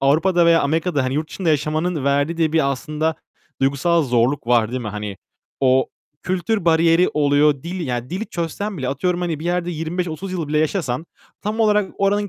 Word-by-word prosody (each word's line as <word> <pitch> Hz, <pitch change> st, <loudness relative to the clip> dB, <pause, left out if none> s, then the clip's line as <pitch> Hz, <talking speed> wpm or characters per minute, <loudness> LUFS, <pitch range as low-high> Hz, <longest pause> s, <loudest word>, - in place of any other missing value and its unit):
Avrupa'da 170 Hz, +5 st, +3 dB
veya 165 Hz, 0 st, +5 dB
Amerika'da 155 Hz, -1 st, 0 dB
hani 130 Hz, +1 st, -1 dB
yurt 155 Hz, +1 st, -2 dB
dışında 185 Hz, -4 st, -3 dB
yaşamanın 155 Hz, +1 st, 0 dB
verdiği 145 Hz, +4 st, +1 dB
de 160 Hz, -2 st, +1 dB
bir 155 Hz, -4 st, +2 dB
aslında 155 Hz, +3 st, -2 dB, 0.5 s
duygusal 140 Hz, +5 st, +2 dB
zorluk 125 Hz, 0 st, +1 dB
var, 120 Hz, -2 st, +3 dB
değil 130 Hz, -, -3 dB
mi? 110 Hz, -, -4 dB
Hani, 105 Hz, -1 st, -5 dB, 0.4 s
o, 130 Hz, -1 st, +3 dB, 0.4 s
kültür 185 Hz, +2 st, -1 dB
bariyeri 165 Hz, +1 st, +4 dB
oluyor. 145 Hz, -1 st, +3 dB
Dil, 175 Hz, 0 st, -4 dB
ya 125 Hz, +1 st, -3 dB
dili 195 Hz, +5 st, -3 dB
çözsen 180 Hz, +4 st, -4 dB
bile 130 Hz, -2 st, -2 dB
atıyorum, 175 Hz, +6 st, -1 dB
hani, 165 Hz, -4 st, -2 dB
bir 160 Hz, -, -7 dB
yerde 175 Hz, 0 st, -1 dB
25-30 175 Hz, +3 st, -4 dB
yıl 165 Hz, -5 st, -3 dB
bile 150 Hz, -, +1 dB
yaşasan 155 Hz, -3 st, -1 dB, 0.4 s
tam 215 Hz, +2 st, -2 dB
olarak 210 Hz, -2 st, +3 dB
oranın 205 Hz, +1 st, +1 dB
160 Hz, 180 wpm, -21 LUFS, 140-180 Hz, 0.5 s, veya